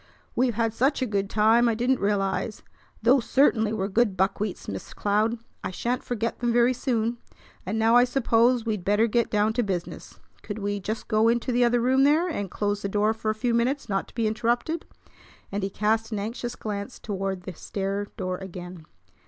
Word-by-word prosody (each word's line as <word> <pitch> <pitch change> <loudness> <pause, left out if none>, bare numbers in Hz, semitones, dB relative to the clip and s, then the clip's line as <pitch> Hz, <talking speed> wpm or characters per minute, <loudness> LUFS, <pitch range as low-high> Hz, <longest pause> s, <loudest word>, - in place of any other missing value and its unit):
We've 245 -2 +2
had 225 -1 0
such 265 +3 +1
a - - +1
good 200 -3 -1
time 225 +3 +4
I 225 - +1
didn't 245 +3 +1
realize. 200 +1 -1 0.4
Those 250 +2 +5
certainly 225 -5 +3
were 200 -3 -1
good 210 -1 +1
buckwheats, 195 +1 -1
Miss 95 -1 -7
Cloud. 215 +3 +1 0.3
I - - -2
shan't 240 +7 -2
forget 230 -1 -3
them 240 -1 +1
very 240 +2 +4
soon. 235 -2 -1 0.5
And 210 +4 -1
now 225 +1 +4
I 245 +1 +7
suppose 240 -1 +2
we'd 210 -5 -2
better 205 +4 +3
get 235 0 +1
down 210 +1 +2
to 245 - +1
business. 190 -6 -5 0.2
Could 205 - -6
we 205 -1 -2
just 215 +4 -4
go 220 0 +3
into 240 +2 +1
the 245 0 +3
other 240 0 +3
room 260 +2 +3
there, 305 +5 +4
and 205 - -3
close 205 +2 -2
the 200 - -2
door 210 +2 +2
for 220 -1 -3
a 215 - 0
few 240 +2 0
minutes, 240 +3 0
not 195 -1 -1
to - - -19
be 230 -1 0
interrupted?" 240 +9 -1 0.6
and 200 +1 -2
he 195 - -1
cast 220 +3 0
an 215 - -2
anxious 230 +4 -4
glance 205 -2 -5
toward 195 -3 -4
the 185 - -6
stair 195 +3 -3
door 185 -3 -3
again. 180 -3 -9
220 Hz, 200 wpm, -26 LUFS, 200-240 Hz, 0.6 s, I